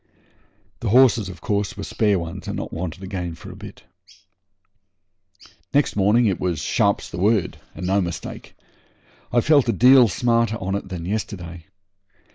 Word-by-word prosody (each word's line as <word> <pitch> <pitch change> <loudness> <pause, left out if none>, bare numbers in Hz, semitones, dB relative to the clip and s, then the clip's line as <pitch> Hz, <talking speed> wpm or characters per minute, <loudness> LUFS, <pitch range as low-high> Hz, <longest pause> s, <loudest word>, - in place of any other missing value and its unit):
The 115 - -2
horses, 120 -3 +4
of 90 - -11
course, 100 -4 -2
were 100 - -5
spare 105 -1 +1
ones, 85 +2 -6
and - - -4
not - - -6
wanted 90 +2 -5
again 90 -3 -5
for - - -11
a - - -11
bit. - - -12 1.9
Next 145 - +2
morning 105 +4 +3
it 95 -4 0
was 90 -3 -1
'sharp's - - 0
the 85 - -6
word', 105 0 +1 0.2
and 90 - -6
no 95 +2 +2
mistake. 85 -2 -6 0.8
I 120 - +3
felt 145 -2 +3
a - - +5
deal 125 +1 +6
smarter 115 +3 +1
on 95 -4 -4
it 100 -1 -4
than 90 -3 -6
yesterday. 90 -4 -5
100 Hz, 160 wpm, -22 LUFS, 90-115 Hz, 1.9 s, deal